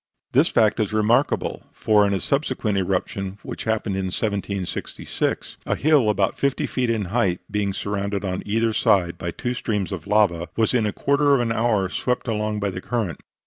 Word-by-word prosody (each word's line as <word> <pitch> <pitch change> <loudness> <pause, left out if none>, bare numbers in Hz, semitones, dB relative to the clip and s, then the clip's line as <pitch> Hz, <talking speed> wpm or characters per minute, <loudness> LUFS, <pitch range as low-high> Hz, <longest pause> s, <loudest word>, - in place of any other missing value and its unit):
This - - +4
fact 110 -1 +2
is 110 -1 0
remarkable; 115 +6 +1
for 105 -1 +3
in 100 - 0
a - - -1
subsequent 130 -6 -1
eruption, 95 +1 -2
which - - -6
happened 110 -3 0
in 95 - -1
1766, 100 -1 -3
a - - +1
hill 145 -6 +3
about 100 -2 +1
fifty 140 -1 +1
feet 125 -2 -1
in 110 -3 0
height, 95 -8 +2
being 105 -1 0
surrounded 100 0 -3
on 90 -1 -2
either 115 +2 0
side 90 -5 +2
by 85 - -3
two 120 +8 -3
streams 105 -6 -2
of 95 -3 -6
lava, 100 -5 +2
was 110 +1 +2
in 115 -4 +2
a - - 0
quarter 140 +3 +2
of - - +2
an 120 -2 0
hour 110 -4 +1
swept 125 +7 -2
along 105 -1 -1
by 100 -1 -1
the 90 - -6
current. 105 - -2
105 Hz, 185 wpm, -23 LUFS, 95-115 Hz, -, This